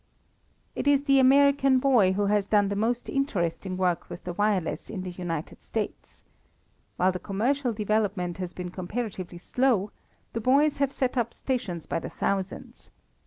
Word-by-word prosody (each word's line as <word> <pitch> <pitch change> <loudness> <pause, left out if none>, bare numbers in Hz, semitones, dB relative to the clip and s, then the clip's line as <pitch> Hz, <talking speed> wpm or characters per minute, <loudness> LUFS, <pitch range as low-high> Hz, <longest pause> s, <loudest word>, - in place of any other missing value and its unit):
It - - -2
is 285 -1 +4
the 275 -2 +4
American 275 0 +5
boy 245 -8 +4
who 205 +1 0
has 205 -1 +1
done 205 -2 +3
the 200 - -2
most 230 +4 -1
interesting 190 - -1
work 180 -2 0
with - - -8
the 180 - -4
wireless 205 -3 0
in 195 -4 -5
the 185 - -5
United 170 -3 -5
States. - - -5 0.7
While 185 +1 +3
the 185 - -5
commercial 245 +8 0
development 205 -4 -1
has 180 -2 -4
been 180 -1 -6
comparatively 185 -1 -5
slow, 215 0 +1 0.4
the 230 - -2
boys 280 +5 +3
have 280 -1 +2
set 260 -2 -1
up 235 -1 -1
stations 220 - -3
by - - -2
the - - -6
thousands. 195 -1 -3
205 Hz, 165 wpm, -27 LUFS, 185-255 Hz, 0.7 s, American